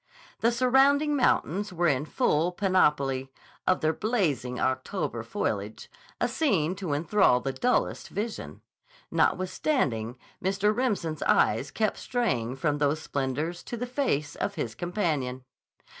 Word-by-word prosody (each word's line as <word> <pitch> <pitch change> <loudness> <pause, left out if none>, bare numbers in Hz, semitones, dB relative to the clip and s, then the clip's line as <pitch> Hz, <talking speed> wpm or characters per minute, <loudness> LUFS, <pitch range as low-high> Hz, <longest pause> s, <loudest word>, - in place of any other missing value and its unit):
The 230 - +3
surrounding 270 +5 +4
mountains 205 - +1
were 175 -1 +1
in 140 -1 +1
full 155 +2 +1
panoply 150 -9 +1 0.4
of 185 - +3
their 155 0 +2
blazing 155 - -1
October 130 - -1
foliage, 105 +1 -3 0.3
a - - +2
scene 185 - +1
to 185 -7 -3
enthrall 160 -3 +3
the 135 +1 -3
dullest 250 - 0
vision. 215 +3 -5 0.5
Notwithstanding, 135 - 0 0.3
Mr. 195 +3 +1
Remsen's 200 - -1
eyes 115 +6 +3
kept 215 -2 -1
straying 130 - -1
from 145 +2 0
those 145 +1 +1
splendors 150 +4 -3
to 240 - -6
the 245 - -3
face 245 - -1
of - - -3
his 115 - -3
companion. 150 - -2
170 Hz, 130 wpm, -27 LUFS, 135-215 Hz, 0.5 s, surrounding